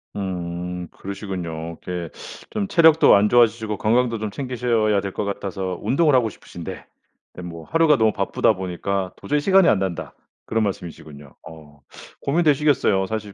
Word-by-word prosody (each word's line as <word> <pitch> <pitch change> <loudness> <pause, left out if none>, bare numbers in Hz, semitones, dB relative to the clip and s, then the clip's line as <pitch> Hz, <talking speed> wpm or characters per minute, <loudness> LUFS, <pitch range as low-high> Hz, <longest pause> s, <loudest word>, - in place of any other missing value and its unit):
음. 90 -2 -4
그러시군요. 85 -5 -6
이렇게 90 -2 -4 0.4
좀 210 -2 -2
체력도 160 -4 +6
안 100 +1 +3
좋아지시고 110 -3 +3
건강도 115 +2 +1
좀 110 -1 -4
챙기셔야 115 -5 0
될 100 - -4
것 - - -3
같아서 95 -2 -4
운동을 150 0 +2
하고 120 -3 +3
싶으신데 - - -9 0.5
에 - - -6
뭐 85 -2 -8
"하루가 165 -3 +3
너무 110 -1 +3
바쁘다 100 +2 +1
보니까 95 0 -3
도저히 150 0 -1
시간이 190 +3 +4
안 100 - +3
난다." 95 -3 -4 0.3
그런 115 0 0
말씀이시군요. 80 -7 -7
어. 75 -2 -14 0.4
고민되시겠어요. 145 - +2
사실 105 0 -5
100 Hz, 365 characters per minute, -22 LUFS, 90-125 Hz, 0.5 s, 체력도